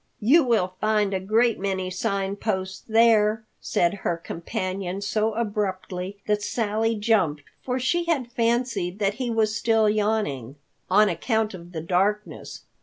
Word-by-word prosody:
"You 280 +10 +5
will 215 -7 +1
find 210 -2 +1
a 190 - 0
great 220 +4 +2
many 190 -1 -2
Sign 195 0 -1
Posts 190 -3 -3
there," 220 -1 +4
said 175 +1 +1
her 170 - -1
companion 185 +3 -4
so 215 +2 0
abruptly 200 -3 -3
that 210 -1 +1
Sally 225 +1 0
jumped, 200 -9 +1 0.2
for 255 0 -2
she 340 +7 0
had 275 -8 -1
fancied 230 -6 0
that 200 -1 +1
he 250 - -1
was 220 -2 +1
still 225 -1 +2
yawning, 210 - -1 0.3
"on 210 +3 +5
account 220 +5 0
of 175 -1 -10
the 160 -3 -5
darkness. 195 +5 -1
210 Hz, 145 wpm, -24 LUFS, 185-225 Hz, 0.3 s, You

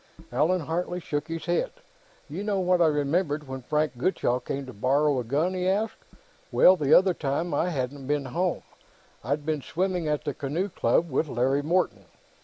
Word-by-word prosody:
Allan 160 +8 +2
Hartley 175 +3 -2
shook 150 -3 -3
his 165 -1 -5
head. 175 0 +1 0.6
"You 200 - -5
know 205 -2 0
what 180 -1 +2
I 165 - +6
remembered, 150 0 0
when 130 0 -6
Frank 150 -1 -1
Gutchall 125 -6 +1
came 140 0 -4
to 130 - -9
borrow 135 +5 +2
a - - -2
gun?" 150 +10 0
he 185 0 -1
asked. 210 +4 -1 0.5
"Well, 185 - +7
the 150 -5 -1
other 190 0 +6
time, 155 +2 -2
I 165 +5 +1
hadn't 135 -3 -4
been 145 -1 0
home: 175 +7 -1 0.6
I'd 145 +5 -2
been 155 -2 -1
swimming 180 +2 -1
at 150 -1 -1
the 145 - -2
Canoe 155 +10 -2
Club, 165 +1 +1
with 155 +4 +1
Larry 135 +2 +1
Morton. 155 - 0
150 Hz, 185 wpm, -26 LUFS, 140-180 Hz, 0.6 s, Well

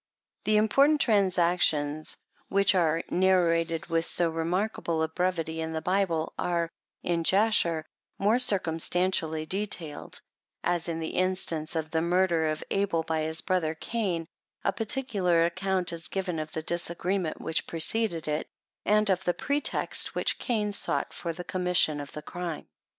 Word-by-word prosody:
The 215 0 +3
important 275 +8 +4
transactions 175 - +2 0.3
which 200 +1 +3
are 165 -3 +2
narrated 170 -3 +2
with 165 -1 0
so 170 0 +3
remarkable 170 0 -1
a - - +1
brevity 160 -1 -2
in 160 0 -4
the 160 - -1
Bible, 180 -4 0
are, 170 -1 -1 0.3
in 170 -1 0
Jasher, 180 -5 +3 0.3
more 215 +5 +2
circumstantially 170 -5 +2
detailed; 180 -5 -2 0.4
as 175 -1 0
in 165 -1 -3
the 160 - -3
instance 180 -4 0
of 160 -1 -3
the 160 - +1
murder 170 -1 +2
of 155 0 -2
Abel 195 -5 0
by 160 -1 -1
his 160 +1 +1
brother 175 -4 0
Cain, 180 -3 -2 0.4
a 195 - +1
particular 205 -8 +1
ac 170 - -1
count 190 -2 0
is 165 0 -6
given 185 -4 -3
of 155 0 -5
the 160 - -3
disagreement 170 +1 -1
which 160 - -2
preceded 170 +1 0
it, 150 0 -2 0.4
and 210 +1 +3
of 190 -1 +1
the 175 - 0
pretext 285 +2 +2
which - - +1
Cain 215 -4 -1
sought 200 - -1
for 170 - -4
the 180 +2 -7
commission 180 -5 +1
of 145 - -9
the 150 - -7
crime. 175 -1 -5
175 Hz, 150 wpm, -28 LUFS, 160-190 Hz, 0.4 s, important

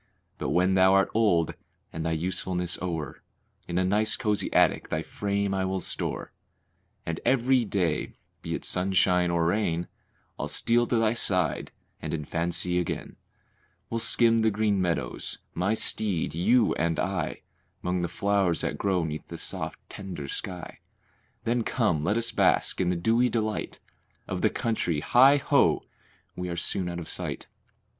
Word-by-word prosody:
But - - -2
when 90 +2 +3
thou 95 0 +5
art 95 - +3
old 95 -8 +2 0.4
and 80 - -4
thy 80 0 0
usefulness 90 +1 -2
o'er, 80 -6 -4 0.5
In 85 - -2
a 95 - +3
nice, 105 +3 +3
cozy 105 -5 -1
attic - - +3
thy - - -1
frame 100 -1 -2
I 95 -1 0
will 95 0 -1
store, - - -4 0.7
And 80 0 -3
every 130 -1 +3
day, 90 -7 -1 0.3
be - - -3
it - - -5
sunshine 90 -1 +2
or 85 -1 +1
rain, 85 -2 0 0.5
I'll - - -2
steal 120 +1 +2
to - - 0
thy 115 -1 +3
side 95 -7 0 0.3
and - - -3
in 75 -2 -5
fancy 85 +2 0
again 90 - -4 0.8
We'll 115 - -1
skim 115 0 +3
the 110 - +4
green 105 -2 +1
meadows, 85 -8 -2 0.2
my 95 +5 0
steed, 100 -5 +1
you 110 +9 +3
and 80 0 0
I, - - -2 0.4
'Mong 90 0 0
the 85 - 0
flowers 100 -1 +1
that - - -3
grow 95 -3 +1
'neath 80 -1 -5
the - - -7
soft, - - -4
tender 90 -8 -7
sky. 90 +5 -6 0.6
Then 120 0 0
come, 105 -11 0
let 105 +7 +1
us 115 0 -1
bask - - +2
in 90 - +1
the 90 - +1
dewy 115 +8 +2
delight 110 -2 -2 0.5
Of - - -3
the - - +4
country 90 -9 -1
hi! 135 - +6
ho! 140 - +3 0.5
we 90 0 -4
are 85 - -4
soon 90 +1 -1
out 85 - -5
of 85 -2 -6
sight. - - -4
95 Hz, 165 wpm, -27 LUFS, 85-110 Hz, 0.8 s, hi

